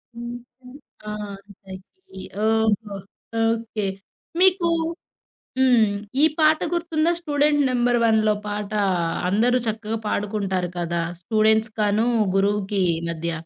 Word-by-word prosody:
హ్మ్. 240 0 -6 0.3
హ్మ్. 250 +2 -12 0.3
ఆ! - - -3 0.5
తకిీ. 190 - -13 0.3
ఓహో! 220 -1 +1 0.6
ఓకే. 225 -3 -3 0.5
మీకు 370 -2 +4 0.9
హ్మ్. 245 -4 +5 0.3
ఈ - - +5 0.2
పాట 310 0 +4
గుర్తుందా? 330 -1 +1
'స్టూడెంట్ 295 -2 +1
నంబర్-1'లో 235 -3 +2
పాట. 205 0 -4 0.6
అందరూ 235 +6 +3
చక్కగా 220 0 -2
పాడుకుంటారు 195 -4 -1
కదా! 170 0 -2 0.2
స్టూడెంట్స్‌కను, 220 +1 +2 0.3
గురువుకి 200 0 +1 0.3
మధ్య. 170 0 -3
220 Hz, 95 wpm, -23 LUFS, 205-250 Hz, 0.9 s, హ్మ్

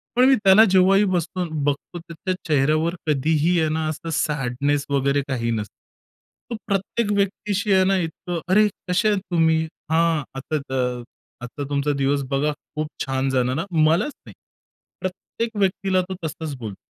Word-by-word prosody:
पण 250 - +5
मी 270 - +6
त्याला 195 +3 +8
जेव्हाही 190 +2 +5
बघतो 180 0 -1 0.2
बघतो 145 +4 -2
त्याच्या 170 +2 -5
चेहऱ्यावर 155 +3 +2
कधीही 155 +4 +2
आहे 155 - +1
ना, 155 0 -1
असं 165 +2 -5
सॅडनेस 140 0 -1
वगैरे 140 0 +1
काही 115 -3 -1
नसतं. 105 -3 -3 0.8
तो 235 - -3
प्रत्येक 205 +2 -1
व्यक्तीशी 200 +1 -1
आहे 190 0 +5
ना 195 0 +3
इतकं 175 0 -4
"अरे! 210 +3 +5 0.2
कसे 185 +5 +2
आहेत 205 - +2
तुम्ही? 160 -1 +3 0.3
हां, 165 -2 +2
आता 155 +3 -2
त 125 -2 -1 0.4
आता 135 +4 -6
तुमचा 145 0 0
दिवस 140 +1 +1
बघा 145 +2 +1 0.2
खूप 155 0 -2 0.2
छान! 135 0 -1
जाणार 130 0 +1
हा," - - -2 0.2
मलाच 165 - +2
नाही - - -12 0.7
प्रत्येक 220 +5 -4
व्यक्तीला 190 -1 +1
तो 190 - -3
तसंच 155 -2 -5
बोलतो. 110 -5 -6
160 Hz, 155 wpm, -22 LUFS, 140-185 Hz, 0.8 s, त्याला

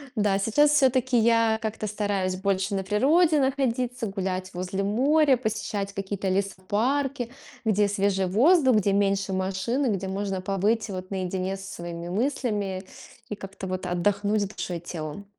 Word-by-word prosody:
Да, 205 -2 +2
сейчас 285 +9 +3
всё-таки 260 -3 +3
я 230 -1 +3
как-то 215 -1 -3
стараюсь 200 -3 -1
больше 195 +1 -1
на 195 - -1
природе 300 - +3
находиться, 255 -3 0
гулять 190 -2 -3
возле 185 +2 -3
моря, 270 +6 +3
посещать 210 -3 -3
какие-то 195 0 -3
лесопарки, 230 +7 -1 0.3
где 210 -1 +3
свежий 195 -1 +1
воздух, 260 - +4
где 200 -2 +2
меньше 195 -1 +1
машин, 190 +8 -1
и - - +2
где 190 0 -4
можно 195 0 -2
побыть 200 +4 0
вот 185 -1 -6
наедине 190 0 -2
со 195 - -10
своими 170 0 -6
мыслями 205 -4 -1 0.5
и 210 - -3
как-то 195 -1 -8
вот 185 0 -4
отдохнуть 205 +3 +1
душой 180 -3 -5
и - - -8
телом. 165 +2 -6
200 Hz, 150 wpm, -26 LUFS, 190-235 Hz, 0.5 s, воздух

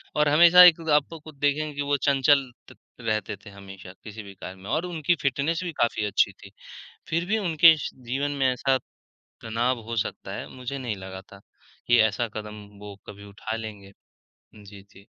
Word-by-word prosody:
और 150 0 +3
हमेशा 175 +4 +8
एक 175 -2 +7
आप 150 -1 +3
तो 165 - -9
खुद 155 0 -14
देखेंगे 145 +1 0
कि 145 - -3
वो 145 0 0
चंचल 140 -1 +2 0.2
त - - -16 0.3
रहते 110 -2 -2
थे, 100 +1 -15
हमेशा 95 -2 -12
किसी 110 0 -9
भी 100 - -11
कार्य 95 - -9
में। 95 +2 -11
और 155 +6 -1
उनकी 170 -1 0
फ़िटनेस 140 +5 -1
भी 175 - -4
काफ़ी 115 -2 +1
अच्छी 105 - +2
थी, - - -16 0.6
फिर 170 +2 0
भी 215 +4 0
उनके 165 -4 +5
स - - -4 0.2
जीवन 140 +4 -2
में 135 - +3
ऐसा 130 +1 +1 0.6
तनाव 120 +2 -1
हो 115 - -3
सकता 105 - -4
है - - -6
मुझे 130 +2 -6
नहीं 120 -6 -4
लगा 95 0 -9
था, 100 +1 -16 0.5
कि 120 - +5
ऐसा 110 +2 +1
कदम 105 -1 -7
वो 105 -1 -10
कभी 100 0 -11
उठा 110 +2 -6
लेंगे। 105 -3 -8 0.6
जी, 100 -1 -13
जी। 100 0 -20
120 Hz, 195 wpm, -25 LUFS, 105-150 Hz, 0.6 s, हमेशा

